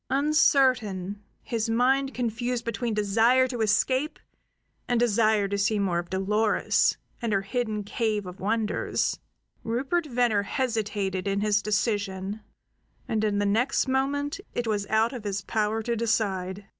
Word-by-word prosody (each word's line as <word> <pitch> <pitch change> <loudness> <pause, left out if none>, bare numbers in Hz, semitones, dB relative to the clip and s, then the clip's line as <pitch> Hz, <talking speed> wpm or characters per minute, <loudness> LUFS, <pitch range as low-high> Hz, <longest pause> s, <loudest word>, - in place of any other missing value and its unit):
Uncertain, 255 - +2 0.2
his 230 -1 -2
mind 265 +4 +2
confused 240 0 -2
between 230 +1 -2
desire 225 +5 +3
to 245 -3 -4
escape 255 +8 +1 0.7
and 245 -1 +1
desire 215 -3 +3
to 200 +1 -2
see 210 +2 +2
more 190 -4 +1
of 175 0 -6
Dolores 210 +3 +1 0.2
and 230 -2 -1
her 195 0 +1
hidden 215 0 -2
cave 210 -1 -1
of 180 0 -9
wonders, 215 +2 -1 0.4
Rupert 270 +9 -1
Venner 240 -5 +2
hesitated 205 -5 -2
in 200 0 0
his 210 -1 +2
decision; 205 -1 -1 0.7
and 220 -1 0
in 210 -1 +1
the 205 - +1
next 235 +8 +1
moment 285 +4 0 0.2
it 240 - -1
was 205 -2 -1
out 220 +3 +2
of 245 -4 -6
his 200 -1 -2
power 220 0 -1
to 235 +1 -1
decide. 200 -4 -1
220 Hz, 145 wpm, -26 LUFS, 205-245 Hz, 0.7 s, desire